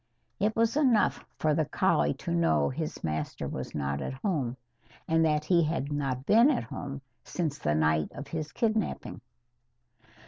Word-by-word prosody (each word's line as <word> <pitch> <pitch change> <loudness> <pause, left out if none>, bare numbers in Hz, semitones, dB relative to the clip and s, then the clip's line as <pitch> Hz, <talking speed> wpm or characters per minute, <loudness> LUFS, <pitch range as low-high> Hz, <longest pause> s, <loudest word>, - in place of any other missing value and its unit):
It 210 +2 +1
was 230 +1 +2
enough 255 -8 +3
for 155 -1 +2
the 155 +1 +1
collie - - +2
to - - -5
know 80 -4 +2
his 65 - -5
master 75 -1 -3
was - - -5
not 70 -1 -2
at - - -3
home, 135 - -1 0.5
and 165 0 +3
that 150 -1 +2
he 175 0 +4
had 155 -3 -1
not 135 -3 -2
been 230 - +6
at 275 - +1
home 140 -1 -6 0.2
since 155 -4 -3
the 75 - 0
night 75 0 +2
of 145 - -7
his 155 0 -4
kidnapping. 220 - -1
150 Hz, 165 wpm, -29 LUFS, -, 0.5 s, been